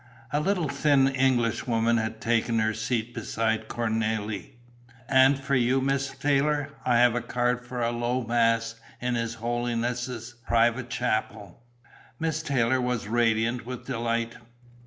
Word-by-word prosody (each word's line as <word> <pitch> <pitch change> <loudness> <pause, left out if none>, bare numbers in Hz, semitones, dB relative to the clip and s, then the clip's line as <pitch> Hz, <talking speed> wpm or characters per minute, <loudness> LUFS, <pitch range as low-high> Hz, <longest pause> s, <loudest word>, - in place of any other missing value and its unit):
A 145 - +2
little 175 0 0
thin 140 -1 +3
Englishwoman 120 -3 +1
had 110 0 -2
taken 115 0 +1
her 110 0 +1
seat 115 +1 -2
beside 110 -1 -1
Cornélie. 110 -2 -2 0.6
"And 130 +1 +5
for 140 0 -4
you, 125 +1 +3
Miss 135 0 0
Taylor, 145 +1 +1
I 125 0 +2
have 120 -1 +5
a 120 - -1
card 125 0 -1
for 125 -1 -4
a 115 - +1
low 120 +2 -1
mass 115 -1 +1 0.3
in 125 0 -1
His 115 -1 -2
Holiness' 120 +1 -3
private 120 +2 +2
chapel." 120 -4 -2 0.6
Miss 160 -1 -1
Taylor 130 -4 +1
was 125 -4 -2
radiant 115 +1 +1
with 125 -1 -6
delight. 115 -2 -2
120 Hz, 135 wpm, -26 LUFS, 115-130 Hz, 0.6 s, And